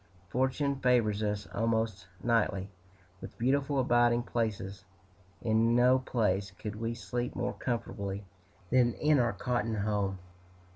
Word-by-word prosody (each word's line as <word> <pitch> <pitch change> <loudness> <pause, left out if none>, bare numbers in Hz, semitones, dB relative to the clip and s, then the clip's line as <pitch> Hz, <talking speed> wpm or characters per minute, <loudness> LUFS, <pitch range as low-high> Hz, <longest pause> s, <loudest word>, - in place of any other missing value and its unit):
Fortune 130 +5 0
favors 115 -5 +2
us, 105 -1 -1
almost 110 -4 0 0.2
nightly, 105 -4 +1 0.5
with - - -9
beautiful 140 +3 +1
abiding 120 -2 +3
places. 100 -4 -3 0.6
In 115 +1 +3
no 125 +2 +5
place 100 -6 0
could 105 +3 -7
we 115 +2 -3
sleep 120 +1 -3
more - - -1
comfortably 100 -4 -3 0.5
than 120 -2 +4
in 150 -2 +3
our 120 -3 +2
cotton 120 +2 -1
home. 100 -2 -1
115 Hz, 125 wpm, -31 LUFS, 105-125 Hz, 0.6 s, no